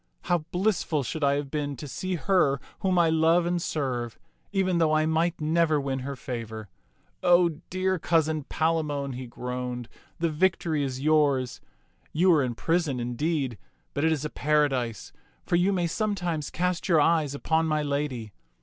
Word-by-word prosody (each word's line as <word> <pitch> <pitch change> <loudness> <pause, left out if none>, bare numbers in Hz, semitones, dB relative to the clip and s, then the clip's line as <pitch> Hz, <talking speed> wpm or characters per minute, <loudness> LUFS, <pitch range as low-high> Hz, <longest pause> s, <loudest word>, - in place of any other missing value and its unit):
How 175 - +2
blissful 180 -6 0
should 155 +5 -4
I 140 0 +4
have 140 -1 -3
been 145 -2 -2
to 145 +4 -8
see 185 +6 -3
her 170 -6 +2 0.2
whom 185 -2 +1
I 170 -2 +4
love 165 +2 +3
and 175 0 0
serve, 125 -8 -2 0.3
even 185 -3 +1
though 160 -2 +3
I 155 0 +3
might 160 +2 +1
never 155 0 +2
win 135 -1 -2
her 140 +2 -5
favor. 110 -4 -6 0.5
O 175 0 +5 0.2
dear 185 0 0
cousin 160 -3 +1
Palamon," 150 -4 -1
he 125 0 -6
groaned, 125 0 -5 0.2
" - - -33
the 165 -1 +1
vic 185 +5 +2
tory 155 -4 -1
is 130 -1 -3
yours. 145 -4 +2 0.5
You 180 +3 +4
are 155 - +4
in 125 -3 -2
prison, 160 -3 0
indeed, 125 - -2 0.3
but 145 - -1
it 160 - +3
is 155 -2 -1
a 150 - -4
paradise, 140 -6 0 0.3
for - - +1
you 180 +3 +3
may 180 -3 +1
sometimes 175 -4 -2
cast 180 +2 -1
your 165 -3 +5
eyes 150 -2 +2
upon 160 +3 +1
my 155 -1 +1
lady. 140 -7 -3
155 Hz, 175 wpm, -27 LUFS, 135-170 Hz, 0.5 s, O